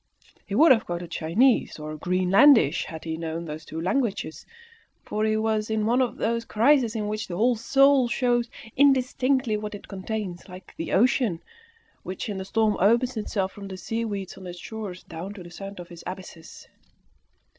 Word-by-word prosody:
He 200 - -3
would 315 +6 +7
have 230 -4 +4
quoted 175 0 -5
Chinese 225 +11 +2
or 155 0 -6
Greenlandish 185 - +4
had 160 -1 -8
he 160 -1 -4
known 165 +1 -4
those 155 0 -7
two 160 +1 -7
languages, 195 -2 -2 0.6
for 215 - -2
he 215 0 +1
was 220 -1 0
in 220 -1 0
one 240 +4 +3
of 250 - -1
those 230 +1 0
crises 235 +1 +3
in 210 -2 -2
which 215 +1 -3
the 175 - -5
whole 240 +4 +3
soul 270 +3 +4
shows 240 -1 +1 0.3
indistinctly 260 -3 +2
what 210 0 -5
it 205 - -11
contains, 195 -2 -5
like 185 +1 -12
the 165 - -5
ocean, 220 -4 +2 0.6
which, 185 +3 -5
in 200 - -3
the 190 - -5
storm, 215 +1 +1
opens 235 +6 +3
itself 200 -3 -2
from 200 -1 -9
the 190 -1 -7
seaweeds 205 -1 -4
on 185 - -9
its 175 0 -8
shores 195 0 -7
down 175 +5 -7
to 185 - -9
the 175 - -12
sands 195 +2 -8
of 175 0 -10
its 170 - -11
abysses. 180 -3 -9
210 Hz, 180 wpm, -25 LUFS, 180-235 Hz, 0.6 s, would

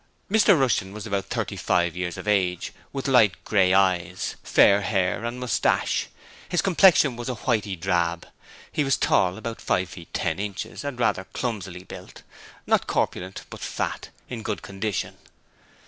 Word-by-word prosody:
Mr 205 -5 +5
Rushton 110 -7 +1
was 110 0 -7
about 100 -3 -2
thirty - - -3
five 85 -1 +1
years 90 -1 -3
of - - -8
age, 90 -4 +1 0.2
with 135 -1 -4
light 115 -9 +5
grey 95 -3 +3
eyes, 95 -1 +1
fair 100 +1 +5
hair 95 0 0
and 120 +1 -4
moustache, 125 -2 +1 0.4
and - - -21
his 175 - +2
complexion 175 -8 +5
was 120 +1 -5
a 125 - -2
whitey 110 -4 -1
drab. 85 -2 0 0.5
He 150 - 0
was 135 -1 +2
tall 90 0 +2
about 115 +1 -6
five 90 -1 0
feet 85 -1 -11
ten 80 -2 -1
inches 105 +4 -5
and 140 -4 -5
rather 95 -5 +1
clumsily 95 -7 -4
built; - - -11 0.4
not - - +2
corpulent, 95 +2 -2
but - - -8
fat - - -3 0.2
in 120 -2 -6
good 105 -1 -4
condition. 100 +1 -3
100 Hz, 165 wpm, -25 LUFS, 90-120 Hz, 0.5 s, Mr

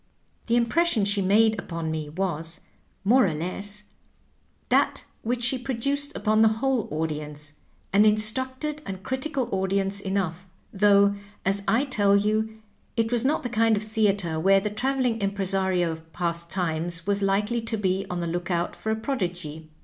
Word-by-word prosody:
^^The 235 - +2
impression 240 0 +2
she 200 0 +1
made 215 +3 +4
npon 165 -3 -4
me 155 -2 -4
was, 165 -1 -3 0.4
more 245 +3 +5
or 160 - -2
less, 200 +6 -3 0.9
that - - +2 0.2
which 240 +1 -1
she 250 +2 +3
produced 275 +4 -2
upon 215 0 +2
the 220 - +7
whole 265 -2 0
audience 150 -1 -4 0.2
— - - -38
an 200 +1 +6
instructed 260 +8 +1
and 190 -1 -6
critical 260 -1 -2
audience 195 +1 0
enough, 190 -2 -2 0.3
though, 200 0 +5 0.3
as 195 +1 +1
I 245 +5 +3
tell 205 -7 +3
you, 215 +2 0 0.3
it 225 0 +1
was 240 -1 +1
not 285 +4 +1
the 245 - -2
kind 225 -1 +3
of 205 - -2
theatre 200 -7 0
where 195 +4 +5
the 210 +1 -3
travel 260 +5 0
ing 230 -3 0
impresario 190 -3 0
of 160 0 -10
past 170 -1 -2
times 170 -1 -2
was 200 0 0
likely 205 +4 +1
to 225 0 -2
be 190 -1 0
on 180 -1 -3
the - - -2
lookout 175 0 -2
for 220 - -3
a - - +1
prodigy. 175 - -4
200 Hz, 165 wpm, -25 LUFS, 175-225 Hz, 0.9 s, the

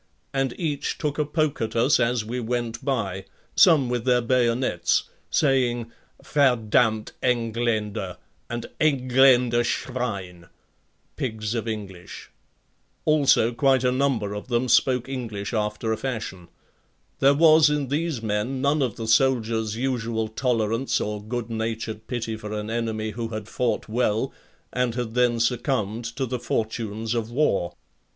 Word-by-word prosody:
And 135 -2 -1
each 150 -5 -2
took 150 0 -2
a 150 - +2
poke 155 -1 -1
at 110 0 -2
us 120 +5 +4
as 115 -2 +1
we 120 +3 -3
went 120 -1 -3
by, 100 -9 -2 0.3
some 160 -9 +6
with 120 -1 -1
their 125 -1 +3
bayonets, 120 -6 +1 0.3
saying: 120 -5 +1 0.3
"Verdamnt 115 -5 +2
Engländer" 115 -3 -1 0.3
and: 120 0 -4
"Engländer 130 -4 +4
Schwein," 100 -8 -3 0.7
pigs 110 -3 -3
of 115 -1 -3
English. 100 -5 -7 0.7
Also 145 -6 +4
quite 130 +1 +3
a 125 - +3
number 130 -6 0
of 105 +3 -6
them 120 0 0
spoke 125 +1 +3
English 115 -6 -5
after 105 +1 -1
a - - -2
fashion. 110 -9 -5 0.7
There 140 +1 +5
was 155 0 +6
in 145 -3 -1
these 150 -4 -1
men 110 +5 -1
none 140 +3 +2
of 125 -6 0
the 115 - -5
soldier's 115 -3 +2
usual 115 -3 -1
tolerance 115 +1 0
or 105 0 -3
good 120 +1 -4
natured 110 -1 -4
pity 115 -3 -3
for 105 -1 -7
an 105 +1 -4
enemy 110 -2 -2
who 115 +2 -4
had 110 -2 -6
fought 115 -1 -1
well 115 +2 0 0.4
and 125 -2 0
had 120 -3 -3
then 120 -1 +2
succumbed 115 -2 0
to 135 0 -1
the 125 0 -3
fortunes 110 -1 -2
of 115 -2 -2
war. 120 - +1
120 Hz, 140 wpm, -24 LUFS, 110-130 Hz, 0.7 s, some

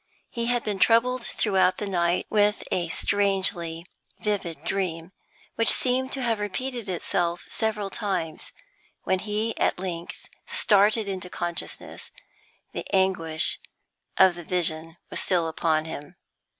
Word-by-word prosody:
He 235 -1 -2
had 245 -1 +1
been 205 -3 -3
troubled 240 +4 +3
throughout 190 -5 +2
the 210 - -3
night 175 -2 +1
with 210 0 +2
a 175 -2 0
strangely 185 -3 0 0.3
vivid 185 -8 -2
dream, 175 -2 -2 0.5
which 230 - +6
seemed 260 +1 +4
to 270 - -2
have 230 -3 +1
repeated 235 +2 -3
itself 175 -1 -1
several 210 -3 -1
times; 185 -7 -3 0.5
when 190 - +1
he 215 +3 -2
at - - +2
length 175 -2 -5 0.2
started 210 +1 +4
into 185 -2 -4
consciousness 175 -1 -5 0.6
the - - -4
anguish 180 -4 +2 0.6
of 190 -1 +6
the 175 0 -9
vision 165 -1 -1
was - - -1
still 175 -3 +2
upon 160 -1 0
him. 150 +1 -8
190 Hz, 130 wpm, -26 LUFS, 170-215 Hz, 0.6 s, which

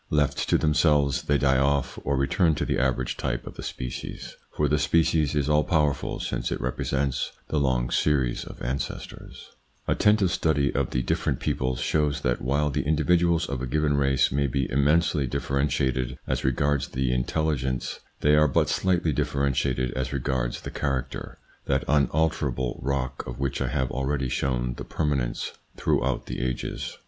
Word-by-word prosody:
Left 75 -2 +1
to - - +5
themselves 75 -3 +3
they 75 - +1
die 65 -2 +3
off 70 0 +1
or 70 0 0
return 75 +4 +2
to - - -2
the - - 0
average 65 -1 0
type - - -2
of - - -8
the - - -9
species, 60 -1 -6
for 75 - 0
the 75 +1 +2
species 80 -1 +2
is 75 -1 +1
all 75 0 +3
powerful 75 -4 0
since - - -2
it - - -2
repre 60 +1 -3
sents 70 -1 -1 0.2
the 75 - +1
long 65 -3 +1
series 65 -5 +1
of - - -10
ancestors, 65 +2 -5 0.4
Attentive 105 -3 +3
study 75 -5 +1
of 70 -3 0
the 60 - -1
different - - 0
peoples 65 -1 -1
shows 75 +1 +1
that 60 0 0
while 70 +4 +1
the 70 +1 0
individuals 85 +3 +2
of 70 -3 -3
a 65 - -2
given 75 +2 +1
race 70 -1 +2
may 70 +1 +1
be 65 0 -1
immensely 75 +2 +2
differentiated 65 -1 -1
as - - -2
regards 70 +2 +1
the 65 -1 -1
intelligence, 65 0 -1 0.2
they 75 - +4
are 75 0 +5
but 65 - +2
slightly 90 -4 +1
differentiated 65 -2 0
as 65 -1 -2
regards 65 -3 -2
the - - -7
character, 65 -2 -3 0.3
that - - +1
unalterable 70 -3 +1
rock 65 -1 -2
of - - -6
which 70 -1 -2
I - - 0
have 65 -1 -1
already 65 0 -1
shown 60 -1 -1
the - - -5
permanence 70 -6 -1 0.3
throughout 65 0 0
the - - -5
ages. 65 -1 -3
70 Hz, 170 wpm, -26 LUFS, 65-75 Hz, 0.4 s, to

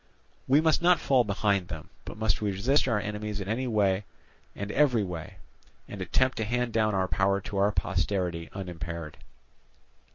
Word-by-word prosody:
We 140 +4 +5
must 160 0 +3
not 175 0 +5
fall 130 -3 +3
behind 100 -3 0
them, 80 -4 -8
but - - -8
must 110 -3 0
resist 105 +8 +1
our 115 -4 +2
enemies 105 0 -4
in 95 - -5
any 120 +5 -1
way 100 -3 +1 0.5
and 100 +1 -4
in - - -7
every 130 -7 +4
way, 90 -1 -6 0.5
and 100 - -7
attempt 130 +8 +1
to 110 - 0
hand 120 +1 -1
down 110 -2 +2
our 95 -1 +1
power 100 +1 +1
to 100 +1 -6
our 100 +1 +3
posterity 90 -2 -1
unimpaired." 85 -4 -6
100 Hz, 170 wpm, -28 LUFS, 95-115 Hz, 0.5 s, We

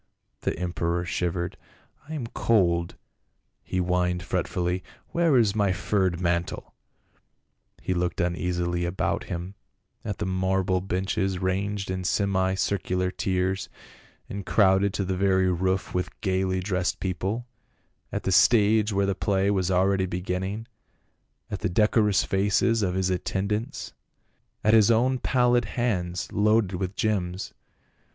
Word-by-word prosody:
The - - -2
emperor 85 -1 -1
shivered. 90 0 -2 0.2
" 145 - -28
I 160 - -4
am 135 -6 -3
cold," 85 -8 +1 0.7
he - - -4
whined 90 0 0
fretfully, 90 +2 -1
" - - -34
where 170 -5 +3
is 110 -4 +3
my 100 -3 +2
furred 95 -1 0
mantle?" 85 -1 -2 1.1
He 95 - -2
looked 90 0 -1
uneasily 85 0 -1
about 85 +2 -1
him, 90 +3 -5 0.5
at 105 -4 -4
the - - -2
marble 95 0 0
benches 95 +1 -1
ranged 95 +2 -2
in 95 0 -3
semi 95 0 +1
circular 95 -1 -1
tiers, 95 0 -1 0.6
and 100 0 -5
crowded 95 0 +3
to 100 - -1
the 95 0 -1
very 95 -1 +2
roof 95 +2 -1
with 90 0 -3
gaily 95 -1 0
dressed 90 -1 -1
people, 95 +5 -2 0.7
at - - -3
the 95 - 0
stage 110 +2 +5
where 100 0 +1
the 100 - +1
play 100 0 +1
was 95 -3 0
already 95 +1 +2
beginning, 95 +4 -3 0.9
at 105 - -3
the 95 - -1
decorous 105 +1 +3
faces 105 +4 +2
of 90 -3 0
his 95 0 +1
attend 95 +2 -2
ants, 105 +3 -3 0.7
at 110 - +4
his 110 -2 +6
own 125 +3 +3
pallid 125 -1 +2
hands 90 -8 -2
loaded 105 -1 +2
with 95 +1 -3
gems. 95 -5 -1
95 Hz, 140 wpm, -26 LUFS, 90-105 Hz, 1.1 s, his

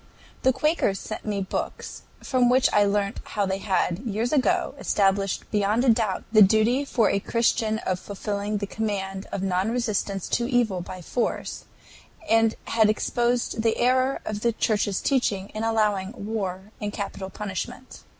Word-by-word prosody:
The 260 - +4
Quakers 265 - +1
sent 215 - -7
me 205 -2 -1
books, 190 - -5 0.2
from 255 -2 +2
which 255 +1 +4
I 205 0 +5
learnt 200 +1 0
how 205 -1 -1
they 190 0 -2
had, 185 -3 0
years 230 +1 -2
ago, 350 +5 +2
established 195 -1 0
beyond 215 +4 +3
doubt 215 -5 -1
the 215 -1 +6
duty 220 +7 +4
for 230 -6 +2
a 200 - +1
Christian 225 0 +1
of 185 -5 -2
fulfilling 205 +1 -3
the 200 - -2
command 195 -2 -3
of 195 - -3
non 190 +2 +1
resistance 210 -5 -1
to 235 0 0
evil 230 -8 +1
by 185 0 -8
force, 240 +7 -2 0.6
and 225 0 +3
had 220 -2 +3
exposed 240 +1 0
the 225 0 +1
error 255 +2 +2
of 210 -1 -4
the 235 0 +2
Church's 210 -3 0
teaching 210 -8 0
in 215 - -5
allowing 210 -3 +1
war 200 -2 -4
and 205 0 -2
capital 200 -1 -5
punishment. 195 -3 -6
215 Hz, 160 wpm, -25 LUFS, 195-235 Hz, 0.6 s, the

